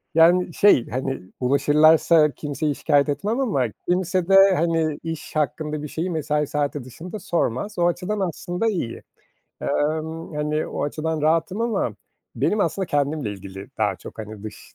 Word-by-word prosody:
yani, 175 +1 +5
şey, 200 - +4
hani, 130 +1 -3 0.2
ulaşırlarsa 150 +4 +4
kimseyi 145 +1 -3
şikâyet 145 -1 +2
etmem 205 - -1
ama 200 - +1 0.2
kimse 185 0 0
de, 195 -1 +7
hani, 165 -2 0
iş 165 -1 -6
hakkında 150 +1 -1
bir - - -4
şeyi 165 +5 -3
mesai 150 -2 -1
saati 145 -2 -2
dışında 175 - -8
sormaz, 175 - -2
o 175 - +4
açıdan 180 +4 -2
aslında 180 +3 -2
iyi. 170 - -3 0.6
Emm, 155 +2 -2
hani, 150 +1 -1
o - - -3
açıdan 155 +1 -2
rahatım 165 +6 +1
ama 235 -1 0 0.4
benim 210 - +1
aslında 190 -2 0
kendimle 145 -6 -1
ilgili 95 0 -9
daha 105 -3 +1
çok, - - -12
hani, 105 -1 -8
dış 110 -1 -10
155 Hz, 150 wpm, -23 LUFS, 145-175 Hz, 0.6 s, de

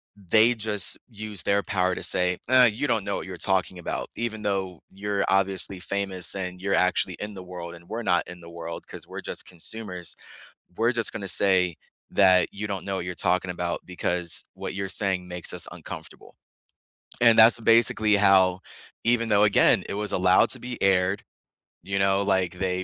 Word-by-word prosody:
they 110 +5 +3
just 105 -3 -1
use 105 -3 -5
their 100 0 +2
power 90 -1 0
to - - -6
say, 90 0 +1
"Ah, 130 -1 +7
you 120 +6 0
don't 110 -3 +1
know 100 - -2
what - - -6
you're 95 -1 -7
talking 95 -1 0
about. - - -4
Even 110 -2 -4
though 95 -4 -2
you're 100 +1 -2
obviously 95 -1 0
famous 95 -1 -3
and 90 -1 -5
you're 100 0 -1
actually 90 0 +2
in 105 0 -6
the 95 -1 -9
world 85 -1 -8
and 85 0 -16
we're 115 +1 -4
not 90 -3 +1
in 90 0 -10
the 85 - -12
world, 85 0 -8
'cause - - -9
we're - - -7
just - - -4
consumers, 90 0 -4 0.6
we're 115 +2 +2
just 115 -2 0
gonna 100 -4 -5
say 90 -2 +2 0.3
that 95 -2 +4
you 105 +2 -5
don't 100 -2 -5
know 100 -1 -3
what 90 - -4
you're 90 0 -5
talking 90 +1 0
about, 85 -1 -3
because 90 -1 -2
what - - -6
you're 95 0 -3
saying 95 -2 -1
makes 90 -1 -4
us - - -3
uncomfortable." - - -10 0.9
And 115 -2 +6
that's 115 +1 +7
basically 110 -2 +4
how 95 -2 +4 0.4
even 115 -1 +2
though, 105 0 +4
again, 100 -1 +4
it - - -3
was 105 0 -3
allowed 90 0 +4
to 130 - -3
be 125 0 -6
aired, 95 0 +2 0.6
you 100 0 -3
know, 95 0 +2
like, 95 -3 +1
they 95 -1 -1
95 Hz, 190 wpm, -25 LUFS, 90-105 Hz, 0.9 s, Ah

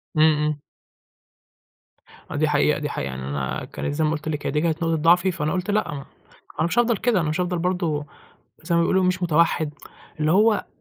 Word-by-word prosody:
امم، 155 - +5 0.2
امم. 150 -1 -1 1.7
آه، - - -4
دي 155 +2 +2
حقيقة، 150 0 +2
دي 150 -1 -3
حقيقة 70 - -3
يعني 65 0 -6
أنا 70 -2 -3
كانت - - -3
زي 155 +2 0
ما 155 - +2
قُلت 155 -1 -3
لِك 150 -2 -4
هي - - -1
دي 150 +1 0
كانت 165 0 -1
نقطة 165 0 +1
ضعفي، 175 +4 +4
فأنا 155 -3 -2
قُلت 185 +2 -2
لأ 210 -7 0
م - - -5
ما 140 - -8 0.6
أنا - - +2
مش 230 - 0
هافضل 235 -2 +2
كده 220 -5 +1
أنا 155 - -1
مش 155 +4 -1
هافضل 180 -1 -1
برضو، 170 -4 -1 0.6
زي 170 +2 -1
ما 170 - +4
بيقولوا 185 +2 +2
مش 185 0 0
متوحّد، 165 -2 +2 0.5
اللي 155 +1 +2
هو، 210 +1 +3
165 Hz, 215 wpm, -23 LUFS, 150-180 Hz, 1.7 s, امم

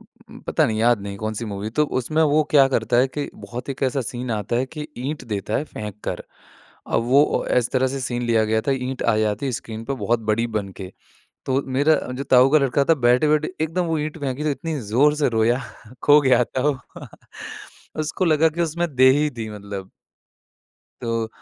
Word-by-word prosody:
हुँ, - - -17
पता - - +2
नहीं 110 -1 -2
याद 120 -2 +3
नहीं 100 0 -6
कौन-सी 110 +1 -3
मूवी। 105 0 -5
तो 150 +6 +2 0.2
उसमें 155 +6 0
वो 155 0 +3
क्या 140 -3 +6
करता 120 -2 0
है 130 +2 +4
कि 145 +2 -4
बहुत 120 +6 -8
एक 135 - -6
ऐसा 135 +1 +1
सीन 125 0 -5
आता 110 +2 -1
है 130 +2 0
कि 150 +1 -7
ईंट 135 +1 -4
देता 100 +2 -2
है 150 - -1
फेंक 105 -6 -8
कर, - - -3 0.6
अब 115 - 0
वो 140 +4 +5
अ, - - -1
इस 120 - -1
तरह 130 0 +2
से 135 +1 -4
सीन 120 -1 -3
लिया 115 -2 +2
गया 110 +1 +1
था, 140 - 0
ईंट 130 0 -3
आ 115 -2 +2
जाती 110 +5 -1
स्क्रीन 110 0 -6
पे 135 - -2
बहुत 120 0 +1
बड़ी 115 +2 +1
बन 100 -1 -5
के। 95 - -7 0.5
तो 135 +1 +1
मेरा 155 +3 +4
अ, 125 - -5
जो 135 +2 -4
ताऊ 130 0 +5
का 155 - +7
लड़का 140 0 +1
था - - +7
बैठे-बैठे 150 +7 +2
एकदम 175 +2 -1
वो 160 -1 0
ईंट 155 +2 -4
फेंकी 140 0 -3
तो 150 - +1
इतनी 155 +1 -3
ज़ोर 145 +6 +4
से 145 -3 +2
रोया, 115 +2 +2 0.4
खो 150 +1 +6
गया 130 -3 +4
था 130 +2 -3
वो। 140 - 0 1.2
उसको 155 +4 -1
लगा 160 -1 +4
कि 165 +2 -6
उसमें 170 -1 -2
दे 130 0 +7
ही 150 +2 +2
दी 115 -4 -6
मतलब। 100 -2 -8 1.1
तो 115 -1 -2
130 Hz, 215 wpm, -22 LUFS, 115-150 Hz, 1.2 s, का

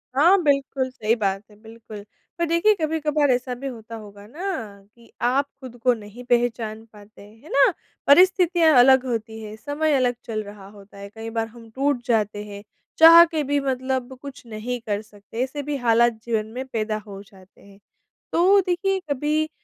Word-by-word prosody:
हाँ, 350 +7 +5
बिल्कुल 275 -2 0
सही 230 -3 -1
बात 195 -2 -2
है, 210 - -18
बिल्कुल। 220 -2 -11 0.4
पर 340 - +2
देखिए, 335 +6 +3
कभी-कभार 305 -2 0
ऐसा 250 +1 -1
भी 275 +3 -7
होता 230 -2 -8
होगा 205 -2 -12
ना, 325 - -7 0.5
कि 235 -1 -21
आप 260 +4 +2 0.2
खुद 250 -2 -10
को 250 -1 +4
नहीं 220 +2 -11
पहचान 230 -2 0
पाते। 210 0 -16
है 220 +8 -17
ना? 280 - +4 0.4
परिस्थितियाँ 350 0 +5
अलग 265 +1 +6
होती 225 -2 -4
हैं, 215 0 -8
समय 290 +5 -1
अलग 250 -2 +1
चल 215 -2 -4
रहा 200 -1 -12
होता 200 -1 -16
है। 200 0 -9
कई 225 0 -7
बार 225 - 0
हम 230 0 -15
टूट 275 -1 0
जाते 210 -3 0
हैं। 200 -1 -10 0.3
चाह 330 +1 +10
के 315 -3 -3
भी 285 +1 0
मतलब 260 -1 -3
कुछ 280 -3 -10
नहीं 230 +3 -5
कर 205 0 -1
सकते। 210 +2 -9
ऐसे 285 +2 -5
भी 295 +1 -3
हालात 230 0 +3
जीवन 225 -3 -1
में 260 - -4
पैदा 215 -3 -2
हो 195 -1 -9
जाते 195 -2 -21
हैं। 200 0 -18 0.5
तो 385 +4 +4
देखिए, 380 +2 0
कभी 300 +3 0
245 Hz, 180 wpm, -23 LUFS, 215-285 Hz, 0.5 s, चाह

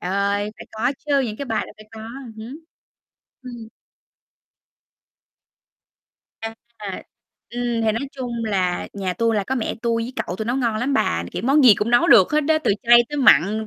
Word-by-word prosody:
ơi, 200 +2 -1
phải - - -11
có 230 +4 -1
chứ, 285 -2 +2
những 225 -5 -3
cái 280 - -5
bài 225 -4 -2
là - - -13
phải 215 - -14
có, 220 - -10 0.4
hứm. 230 +7 -9 0.8
Ừm. 240 -3 -9 2.7
À. 225 0 -6 1.0
Ừm, 240 -1 -2
thì 220 -1 +2
nói 265 +6 -4
chung 240 -3 -4
là 185 -4 -1
nhà 190 -2 -3
tui 230 +4 0
là 200 - 0
có 265 - -2
mẹ 240 -4 -2
tui 230 -1 0
với 240 +3 -6
cậu 180 - -5
tui 220 - -4
nấu 240 +3 -1
ngon 235 -5 0
lắm 255 +5 -1
bà, 85 - 0
kiểu, - - -4
món 275 +3 +4
gì 235 -5 +8
cũng 210 +3 -2
nấu 240 0 +4
được 190 +4 +6
hết 305 - +3
đá, 310 +1 +2
từ - - +3
chay 240 0 +7
tới 295 - -5
mặn 220 - +4
230 Hz, 190 wpm, -21 LUFS, 210-250 Hz, 2.7 s, gì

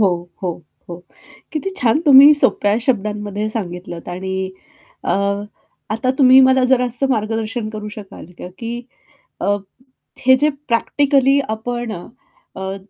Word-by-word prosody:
हो, 175 -3 0
हो, 180 - -1 0.4
हो. 175 0 -8 0.5
किती 325 +5 -3
छान 245 -2 +2
तुम्ही 280 +1 +9
सोप्या 205 -7 +2
शब्दांमध्ये 210 -2 -2
सांगितलंत 180 -5 -6
आणि 190 +1 -4 0.5
अ, - - -1 0.8
आता 225 +4 0
तुम्ही 260 -1 +7
मला 260 0 +4
जरासं 250 +1 +1
मार्गदर्शन 225 -1 -2
करू 210 -1 -7
शकाल 205 -5 -11
का - - -7
की 235 +1 -5 0.6
अ, 205 0 +1 0.7
हे 260 0 +7
जे 295 +3 +2 0.2
प्रॅक्टिकली 275 +3 +2
आपण 235 +1 -4
अ, 175 -4 -8 0.5
अ, 190 0 -4
225 Hz, 125 wpm, -18 LUFS, 200-260 Hz, 0.8 s, तुम्ही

